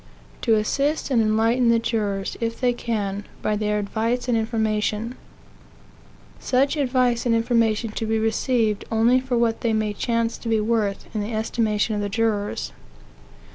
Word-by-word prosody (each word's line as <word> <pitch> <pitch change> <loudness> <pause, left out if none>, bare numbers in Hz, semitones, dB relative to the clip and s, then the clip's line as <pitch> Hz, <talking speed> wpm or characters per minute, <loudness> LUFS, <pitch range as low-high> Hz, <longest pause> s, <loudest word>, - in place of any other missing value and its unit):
To 225 -3 +3
assist 280 +8 0
and 235 -3 +4
enlighten 225 +3 +2
the 230 - +5
jurors, 205 -4 -2
if 230 0 -2
they 250 -1 +2
can, 205 -4 -3 0.2
by 215 - +1
their 210 0 0
advice 225 +4 -1
and 245 - +2
information; 220 0 -1 1.3
such 270 +4 +1
advice 255 -4 +1
and 230 - +3
information 230 -1 +1
to 220 +1 -3
be 220 0 +1
received 220 -1 +1
only 230 +3 +4
for 255 -1 -2
what 230 -1 +1
they 230 -2 +1
may 215 -1 0
chance 230 +1 -1
to 230 - -5
be 225 -1 +2
worth 215 -2 0
in 215 - -1
the 215 +2 -4
estimation 220 -1 0
of 205 - -1
the 205 - -2
jurors. 205 - -1
225 Hz, 160 wpm, -23 LUFS, 215-235 Hz, 1.3 s, the